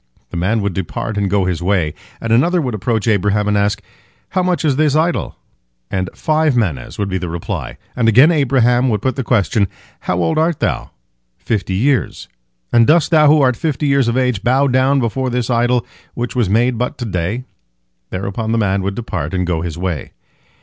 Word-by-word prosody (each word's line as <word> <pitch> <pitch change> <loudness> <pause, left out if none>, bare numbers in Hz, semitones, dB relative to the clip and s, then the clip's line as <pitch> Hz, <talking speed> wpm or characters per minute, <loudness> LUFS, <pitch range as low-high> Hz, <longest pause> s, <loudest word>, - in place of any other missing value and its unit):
The - - -7
man 100 +5 0
would 100 -2 -1
depart 95 +4 -4
and 100 -1 0
go 100 -1 +1
his 90 -2 -2
way, 90 -5 0 0.3
and 115 0 -1
another 170 +10 +3
would 130 -7 -2
approach 110 +1 -1
Abraham, 105 0 +1
and 105 - +1
ask, 100 0 0 0.5
"How 185 - 0
much 180 -2 0
is 145 -3 +2
this 150 0 +2
idol?" 165 +2 0 0.6
and 95 -2 -1
"Five 155 -3 +1
manehs" 85 - -2
would 100 - -1
be 95 -1 -2
the 90 -1 -4
reply, 85 0 -5 0.2
and 115 -2 +2
again 130 +9 +6
Abraham 130 -4 +2
would 105 -2 -1
put 130 - 0
the 135 - -2
question, 105 -3 +1 0.3
"How - - -2
old 85 - +1
art 160 -1 +1
thou?"—"Fifty - - -4
years."—"And 95 - -1
dost 160 0 +3
thou 155 -2 +5
who 150 +1 +5
art 130 -2 +3
fifty 150 +2 -2
years 140 -3 +2
of 120 +1 0
age 125 -6 +1
bow 130 +5 +2
down 135 +1 +2
before 130 +2 -1
this 125 0 -1
idol 120 +1 +1 0.3
which 120 +1 -4
was 120 -6 +1
made 120 +3 +2
but 125 - -2
to 120 - -4
day?" 95 +4 -2 0.7
Thereupon 100 +4 -3
the - - +1
man 100 -3 +1
would 100 +1 -3
depart 115 -4 -4
and 90 0 0
go 85 -2 -1
his 85 -1 -5
way. 90 -4 -4
115 Hz, 195 wpm, -17 LUFS, 95-130 Hz, 0.7 s, again